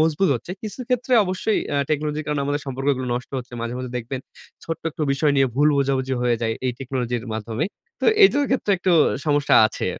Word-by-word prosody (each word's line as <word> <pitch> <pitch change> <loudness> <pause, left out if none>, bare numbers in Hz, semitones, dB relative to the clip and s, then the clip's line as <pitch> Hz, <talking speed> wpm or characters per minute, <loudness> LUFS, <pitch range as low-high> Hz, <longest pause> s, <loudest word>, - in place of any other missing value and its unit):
মজবুত 160 +4 +2
হচ্ছে। 120 +7 -6
কিছু 215 +2 -6
ক্ষেত্রে 250 0 0
অবশ্যই 185 +4 0 0.2
আ - - +1
টেকনোলজির 150 0 -1
কারণে 150 -1 -1
আমাদের 145 +1 -1
সম্পর্কগুলো 135 0 -1
নষ্ট 125 0 -5
হচ্ছে। 125 -1 -9
মাঝে, 115 +1 -3
মাঝে, 125 -1 -5
দেখবেন 125 +2 -4 0.4
ছোট্ট 165 - -5
একটু 155 - -5
বিষয় 145 +1 +2
নিয়ে 135 - +4
ভুল 145 +3 +4
বোঝাবুঝি 135 -1 0
হয়ে 120 -1 +2
যায় 115 -1 0
এই 125 - 0
টেকনোলজির 125 -2 -3
মাধ্যমে। 110 +5 -3 0.4
তো - - -2 0.2
এইটার 290 -7 +6
ক্ষেত্রে 260 -5 0
একটু 185 0 +1 0.3
সমস্যা 145 -2 +3
আছে। 110 - -4
140 Hz, 190 wpm, -22 LUFS, 125-155 Hz, 0.4 s, এইটার